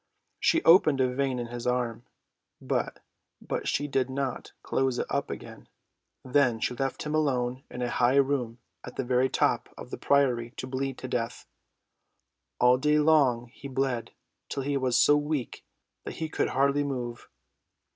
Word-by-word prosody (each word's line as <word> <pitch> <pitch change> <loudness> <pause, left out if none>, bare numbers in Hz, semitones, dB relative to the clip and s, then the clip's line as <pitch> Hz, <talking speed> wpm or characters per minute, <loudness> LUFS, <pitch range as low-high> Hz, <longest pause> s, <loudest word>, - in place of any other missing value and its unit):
She 330 - +2
opened 155 -5 +6
a 130 -1 +2
vein 135 -1 0
in 120 - -3
his 120 +1 -6
arm, 120 -2 -1 0.5
but - - -2 0.6
she 145 - 0
did 135 -2 0
not 135 -1 -3
close 130 -2 0
it - - -1
up 140 0 -1
again. - - -8 0.6
Then 130 -3 +2
she 125 - -1
left 135 +2 -3
him 150 - -3
alone 130 -4 0
in 125 - -5
a 120 - -1
high 120 +2 +3
room 135 -4 +1 0.3
at 125 - -9
the 135 - -2
very 125 +1 +2
top - - +1
of - - -10
the - - -5
priory 125 -4 +2
to - - -4
bleed 130 0 -3
to 130 - -6
death. 120 -1 -3 1.1
All 125 +1 +5
day 150 +2 +3
long 140 -6 +3
he 140 - -9
bled 130 -3 -1 0.4
till 135 - -3
he 145 +1 -1
was 130 -3 +1
so 145 +4 +6
weak 145 -4 -2 0.4
that - - -6
he 160 -1 -4
could - - 0
hardly 140 +2 +2
move. 125 -4 -5
130 Hz, 165 wpm, -28 LUFS, 125-140 Hz, 1.1 s, opened